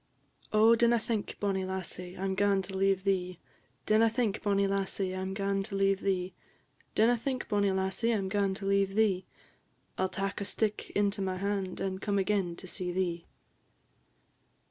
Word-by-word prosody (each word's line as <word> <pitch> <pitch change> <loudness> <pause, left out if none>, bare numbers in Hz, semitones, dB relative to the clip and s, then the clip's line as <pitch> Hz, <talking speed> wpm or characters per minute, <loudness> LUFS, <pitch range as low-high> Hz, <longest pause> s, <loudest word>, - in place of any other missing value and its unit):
"_ - - -23
"Oh, 220 +2 +6
dinna 235 +1 +4
think, 220 -2 -3
bonnie 195 -2 0
lassie, 185 -1 -5
I 190 - -5
'm 195 0 0
gaun 195 0 +2
to 190 +1 -6
leave 195 0 +2
thee! 185 -2 0 0.5
Dinna 220 +1 +4
think, 225 -3 -1
bonnie 200 -1 +2
lassie, 195 -1 -1
I - - -3
'm 190 0 -3
gaun 195 0 0
to 195 - -6
leave 195 0 +2
thee; 185 -1 -1 0.6
Dinna 230 +3 +5
think, 255 +2 -3
bonnie 205 -2 +2
lassie, 190 +4 0
I 225 - +2
'm 195 -2 -2
gaun 195 -1 0
to 195 - -6
leave 195 0 +2
thee; 200 -4 +2 0.7
I - - +2
'll - - -2
tak 195 +2 -3
a - - -2
stick 215 +1 -1
into 205 -1 +1
my 185 -1 -1
hand, 195 -1 -2
and 190 0 -3
come 205 -2 0
again 195 -1 +1
and 185 - -9
see 180 0 -4
thee." 175 -2 -2
195 Hz, 190 wpm, -30 LUFS, 190-205 Hz, 0.7 s, Oh